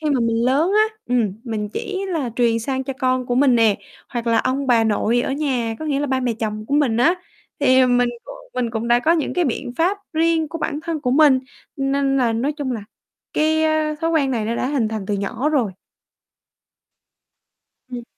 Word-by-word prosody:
khi 305 -1 -1
mà 265 -4 +2
mình 230 0 +1
lớn 290 +9 +2
á, 435 +1 +2
ừm, 240 -5 +1
mình 215 -3 -3
chỉ 390 - -4
là 310 -9 -2
truyền 235 -2 +2
sang 265 +3 -3
cho 270 - -3
con 255 -2 0
của 245 - 0
mình 260 -1 +4
nè, 225 -3 +4 0.3
hoặc 240 -1 -4
là 230 -1 +3
ông 270 +2 0
bà 235 -3 +4
nội 220 +2 +1
ở 270 - -2
nhà, 260 -6 -1
có 315 - -6
nghĩa 285 -2 0
là 290 - -1
ba 265 -1 0
mẹ 250 -2 0
chồng 215 -1 -3
của 280 - -1
mình 280 -6 +2
á, 300 +9 +4 0.5
thì, 260 -2 +5
ờ, 255 - +5
mình 245 0 +3
c 240 -1 -9 0.3
mình 245 -2 -1
cũng 225 +1 -3
đã 240 0 +5
có 310 +7 +2
những 330 -3 -1
cái 360 - +2
biện 245 -2 -3
pháp 365 +5 +1
riêng 325 0 +1
của 330 +1 -6
bản 295 -2 -2
thân 325 -2 -3
của 255 -4 -1
mình, 280 -1 +5 0.4
nên 275 0 +1
là 245 -4 +2
nói 250 +6 -1
chung 285 -4 -3
là 230 - -4 0.5
cái, 315 +1 +2
ơ, 310 -1 +1
thói 330 0 0
quen 300 -5 +2
này 230 -4 -1
nó 225 +2 -1
đã - - -1
hình 265 -6 0
thành 215 -3 -5
từ 205 - -1
nhỏ 210 +7 -2
rồi. 255 -10 +1 2.2
Ừm. 245 -1 -6
260 Hz, 225 wpm, -21 LUFS, 235-305 Hz, 2.2 s, thì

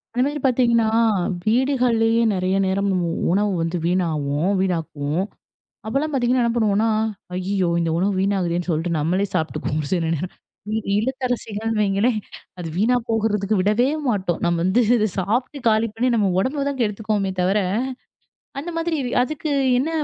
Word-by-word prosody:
அந்த 250 - +3
மாதிரி 290 +1 -3
பார்த்தீங்கன்னா, 235 -3 +3 0.6
வீடுகள்லயே 235 -1 +2
நிறைய 185 +1 0
நேரம் 200 +1 0
நம்ம 180 -2 0 0.3
உணவு 205 +2 +2
வந்து 165 +2 -1
வீணாவும் 165 -2 0
வீணாக்குவோம். 165 -3 -1 0.6
அப்பல்லாம் 280 +7 -1
பாத்தீங்கன்னா 245 -2 +2
பண்ணுவோன்னா, 215 -2 +2 0.5
ஐயய்யோ! 185 -1 0
இந்த 165 -1 0
உணவு 195 +3 +1
வீணாகுதேன்னு 180 -3 0
சொல்ட்டு 165 +2 -1
நம்மளே 180 +6 +1
சாப்பிட்டுக்குவோம். 155 -2 -1
சில 175 -3 +1
நேரம் 180 +5 -5 0.4
இ - - +1 0.2
இல்லத்தரசிகள்ன்னு 225 -3 -2
வைங்களேன் 210 +3 +1 0.4
அது 170 -2 -5
வீணா 230 +6 +3
போகுறதுக்கு 215 -2 +1
விடவே 215 +7 +2 0.2
மாட்டோம். 190 -7 0
நாம் 170 -1 +1
வந்து 190 +7 +3 0.2
இத 215 -1 +2
சாப்ட்டு 240 +9 -1
காலி 220 +1 +3
பண்ணி, 250 +2 +1
நம்ம 205 -4 +2
உடம்ப 275 +8 0
தான் 280 - -4
கெடுத்துக்குவோமே 210 -2 -1
தவர, 190 +4 +2 1.0
அந்தமாதிரி 330 +1 -2 0.3
அதுக்கு 305 +2 -4 0.3
என்ன 285 +5 0
210 Hz, 135 wpm, -22 LUFS, 185-240 Hz, 1.0 s, அந்த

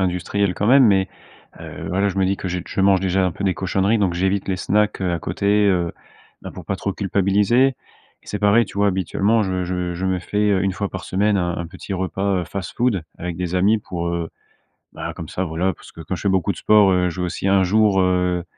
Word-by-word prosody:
industriels, 95 +1 0
quand 105 - -1
même 135 +1 +6
mais 95 -3 +3 0.5
heu, - - -8
voilà, 100 +3 +1
je 95 - -5
me 95 - +2
dis 95 +1 0
que 95 - -5
j 90 0 -3
je 95 - -2
mange 95 -1 +4
déjà 95 0 +1
un 90 - 0
peu 100 - -7
des 95 -2 +2
cochonneries, 95 +4 +1
donc 95 -4 +1
j'évite 95 +3 -1
les 95 -1 -1
snacks, 105 +1 0
heu, 90 -2 0
à 85 - -2
côté, 90 +5 -4 0.2
heu, 85 -3 +1 0.5
bah, - - -8
pour - - -10
pas - - -2
trop - - -3
culpabiliser 105 +7 +2
et 135 - -3 0.5
c'est 105 - -4
pareil, 105 +2 +4
tu 100 - -11
vois, 100 0 +3
habituellement, 100 +4 +1
je 95 -1 -2
je 90 -1 -3
je 95 +2 -4
me 95 -1 0
fais, 105 +3 0
heu, 95 - +2
1 95 -1 0
fois 100 +1 -3
par 95 -1 -7
semaine 100 +2 +1
un 85 -1 -1
un 85 -1 -4
petit 95 +2 -8
repas, 95 +1 -1
heu, - - -4
fast-food 100 +1 -2
avec 85 -1 -5
des 90 0 -3
amis 100 +5 +3
pour, 85 -3 -5
heu, 85 -1 -3 0.6
bah, - - -6
comme - - -8
ça, 95 - -3
voilà, 90 +3 -1
parce - - -16
que - - -12
quand 90 +3 -4
je - - -9
fais 100 - +1
beaucoup 95 -3 +1
de - - -13
sport, 105 -2 +5
heu, 90 0 +2
je 90 +2 -5
veux 90 - 0
aussi 95 +2 -3
un 95 -1 +4
jour, 100 +1 +3
heu 90 -1 +1
95 Hz, 250 wpm, -21 LUFS, 90-100 Hz, 0.6 s, même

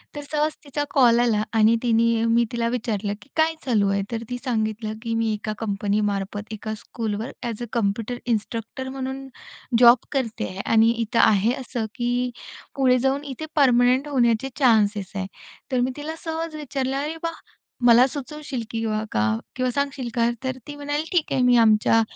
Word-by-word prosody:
तर 290 - -4
सहज 305 0 +1
तिचा 290 0 -3
कॉल 240 -4 +5
आला 225 -3 +2
आणि 220 +1 +5
तिने 230 -1 +3
मी 230 +1 +3
तिला 235 -1 -1
विचारलं, 215 -4 -2
की 270 - -18
"काय 320 0 +3
चालू 210 -6 +2
आहे?" 200 0 +1
तर 230 -1 -3
ती 245 - -3
सांगितलं, 220 -3 -1
की 230 -1 -3
"मी 225 -1 +1
एका 215 0 -4
कंपनीमार्फत 205 0 -2
एका 215 +1 -5
स्कूलवर 220 +1 -4
एएस 235 -2 -4
अ - - -2
कॉम्प्युटर 230 +2 -1
इन्स्ट्रक्टर 230 +2 -3
म्हणून 265 0 -5 0.5
जॉब 240 0 +8
करते 260 -6 -2
आहे 185 - -8
आणि 225 0 +6
इथं 230 0 -1
आहे 215 +1 +4
असं 240 -3 -3
की 245 +1 -1 0.4
पुढे 255 -2 +4
जाऊन 270 +2 0
इथे 285 +2 -6
परमनंट 255 -1 +4
होण्याचे 245 -2 +2
चान्सेस 210 -6 +3
आहेत." 190 -1 -3 0.4
तर 255 - +1
मी 250 +1 +1
तिला 305 +2 -5
सहज 325 0 -3
विचारलं, 275 -3 -2
"अरे 300 +3 -3
वाह! 330 0 -3 0.5
मला 240 +2 +7
सुचवशील 285 -2 -6
किंवा 220 -1 -1
का 110 +1 +1 0.2
किंवा 255 0 0
सांगशील 275 -1 -2
का?" 235 0 +2
तर 260 0 -2
ती 295 - -7
म्हणाली, 290 +1 -2
"ठीक 350 -4 +1
आहे, 260 - +2
मी 250 0 +5
आमच्या 215 +1 +4
240 Hz, 175 wpm, -23 LUFS, 220-270 Hz, 0.5 s, जॉब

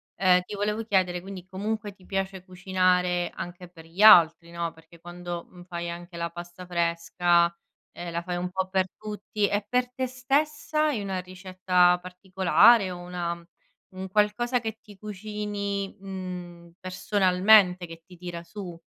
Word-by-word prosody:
ehm, 180 -1 +4
ti 180 - -10
volevo 210 +2 -1
chiedere 185 -5 +1
quindi 190 -1 -9
comunque 205 +2 -4
ti 190 -1 -21
piace 195 -1 -3
cucinare 180 -1 +1
anche 175 0 -8
per 165 -2 -15
gli 170 +5 -6
altri, 170 -5 +7
no, 170 -1 -3
perché 165 +1 -18
quando, 175 0 -7
mhmm, 180 -1 -13
fai 170 -1 -5
anche 175 +1 -8
la 170 0 -2
pasta 175 +2 -9
fresca, 170 0 +2 0.5
ehm, 175 0 -6
la 170 0 -2
fai 180 0 -4
un 180 +1 -2
po' 190 +1 -2
per 190 0 +1
tutti. 210 0 -2
E 205 0 -1
per 250 +1 0
te 260 +1 -1
stessa, 295 +4 0
hai 265 -8 -1
una 195 -2 -3
ricetta 185 -1 +2
particolare 185 +3 +4
o 180 - -6
una 175 -1 -4 0.5
un 190 0 -6
qualcosa 215 +5 +1
che 220 -1 -5
ti 205 -2 -15
cucini, 205 -1 -4
uhm, 180 -3 -7
personalmente, 185 0 +4
che 165 -1 -11
ti 180 - -15
tira 175 -1 -7
su? 175 -1 -9
185 Hz, 160 wpm, -26 LUFS, 175-205 Hz, 0.5 s, altri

